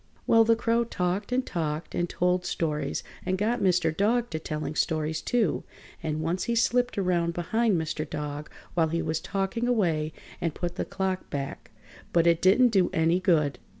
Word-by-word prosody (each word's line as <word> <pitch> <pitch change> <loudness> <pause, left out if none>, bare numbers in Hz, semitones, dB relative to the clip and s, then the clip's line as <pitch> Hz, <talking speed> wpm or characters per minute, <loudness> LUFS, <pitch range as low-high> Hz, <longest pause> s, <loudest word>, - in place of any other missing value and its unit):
] - - -32
Well, 225 0 +6
the 230 0 +4
Crow 230 0 +1
talked 195 -1 -2
and 255 +1 +1
talked 155 -2 -3
and 175 0 -1
told 180 0 +1
stories 150 -5 -2 0.2
and 185 - 0
got 225 +5 0
Mr. 175 -4 +2
Dog 235 +5 +1
to 160 - -2
telling 155 -1 -4
stories, 155 0 0
too, 240 -3 +1 0.4
and 155 -1 -2
once 170 +3 -1
he 235 - 0
slipped 245 +1 +2
around 175 -3 +1
behind 215 +4 +1
Mr. 155 -1 -3
Dog 150 0 -5 0.2
while 165 -2 +3
he 165 +1 -1
was 160 0 -1
talking 195 +7 -2
away 165 -10 +1 0.3
and 165 -3 -1
put 175 -1 -3
the - - -2
clock 190 -1 -3
back, 140 -1 -5 0.4
but 170 -1 +4
it 170 -1 +4
didn't 225 +7 +6
do 195 -5 +3
any 165 +2 +3
good. 150 -8 +2
175 Hz, 185 wpm, -27 LUFS, 160-210 Hz, 0.4 s, Well